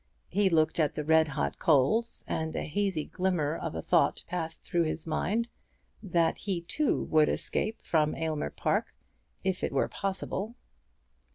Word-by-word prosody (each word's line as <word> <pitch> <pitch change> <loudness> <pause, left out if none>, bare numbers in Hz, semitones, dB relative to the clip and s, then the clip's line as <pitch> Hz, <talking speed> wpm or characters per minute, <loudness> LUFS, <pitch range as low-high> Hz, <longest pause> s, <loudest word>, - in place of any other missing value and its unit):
He 200 +1 +3
looked 160 -1 +2
at 150 -3 +2
the 150 - -2
red 160 +1 +4
hot 70 - -2
coals, 160 - +2
and 160 0 -2
a - - -1
hazy 190 -2 -1
glimmer 175 -5 0
of 80 - -4
a 80 - -4
thought - - +2
passed 165 -2 -4
through 170 -1 +1
his 155 0 -3
mind, 215 +8 0 0.5
that 170 -5 +1
he 190 -4 -2
too 285 - 0
would 155 -1 +4
escape 220 +1 -1
from 155 -2 +2
Aylmer 155 - -2
Park, - - -1 0.5
if 190 -1 -1
it - - 0
were - - +2
possible. 195 +3 -3
165 Hz, 160 wpm, -29 LUFS, 155-190 Hz, 0.5 s, red